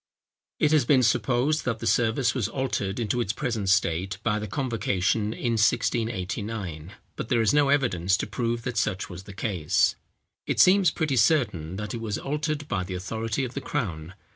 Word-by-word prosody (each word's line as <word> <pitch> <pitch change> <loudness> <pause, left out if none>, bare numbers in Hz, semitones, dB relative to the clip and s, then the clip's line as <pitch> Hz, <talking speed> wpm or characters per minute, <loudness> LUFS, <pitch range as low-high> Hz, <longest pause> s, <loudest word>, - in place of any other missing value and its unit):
It 150 - +2
has 155 -4 +4
been 130 0 +4
supposed, 125 +6 +2
that 115 -3 0
the - - -7
service 120 +2 +2
was 120 -7 -1
altered 115 -6 -2
into 120 +1 0
its 100 - 0
present 110 -4 -2
state 95 -1 +1
by 105 -2 +1
the 105 - -5
convocation 110 -5 0
in 120 +1 -2
1689; 105 -6 -1 0.2
but 110 - -5
there 120 - +2
is 105 - +3
no 145 -1 +4
evidence 100 -10 +2
to - - -2
prove 115 -1 -2
that 125 -2 -4
such 95 -5 -1
was 90 +2 -9
the 100 - -9
case. 95 -7 +1 0.5
It - - -1
seems 190 -1 +6
pretty 155 -5 -1
certain 105 - +2
that 105 +4 -5
it 115 - -4
was 110 -3 -2
altered 150 +1 -3
by 95 -8 -1
the 90 0 -5
authority 110 +6 -2
of 125 - -7
the 140 - -4
crown. 90 - -4
115 Hz, 185 wpm, -26 LUFS, 95-130 Hz, 0.5 s, seems